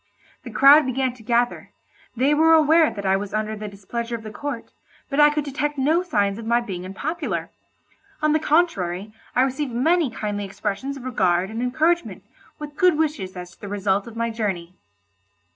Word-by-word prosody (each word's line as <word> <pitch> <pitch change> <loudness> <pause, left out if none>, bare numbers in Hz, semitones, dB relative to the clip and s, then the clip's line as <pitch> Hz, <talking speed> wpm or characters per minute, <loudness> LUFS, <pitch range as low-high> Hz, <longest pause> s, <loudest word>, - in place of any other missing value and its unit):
The - - -9
crowd 280 +1 +6
began 260 0 0
to 250 - -16
gather; 240 +2 -1 0.4
they 270 +5 +3
were 320 +2 +5
aware 320 0 +5
that 200 -2 -7
I 190 0 +3
was 200 +1 -4
under 215 0 -2
the 210 0 -6
displeasure 230 +4 -5
of 225 - -8
the 215 - -7
court, 265 +1 -6 0.4
but 275 - 0
I 295 0 +8
could 300 0 -1
detect 295 +1 -3
no 305 +6 +2
signs 205 - 0
of 230 - -7
my 235 +1 +3
being 190 -7 -6
unpopular. 195 - -4 0.7
On 305 0 +2
the 310 - +3
contrary, 215 - 0 0.2
I 255 - +5
received 265 +1 -2
many 320 +5 +2
kindly 210 -2 -4
expressions 210 +8 -4
of 260 - -10
regard 185 -6 +1
and 225 +2 -4
encouragement, 315 +8 0 0.3
with 295 -1 -9
good 365 -5 +4
wishes 295 -13 -2
as 180 0 -8
to - - -22
the 205 - -7
result 200 0 -1
of 230 - -10
my 230 0 -1
journey. 190 -6 -3
240 Hz, 190 wpm, -23 LUFS, 205-295 Hz, 0.7 s, I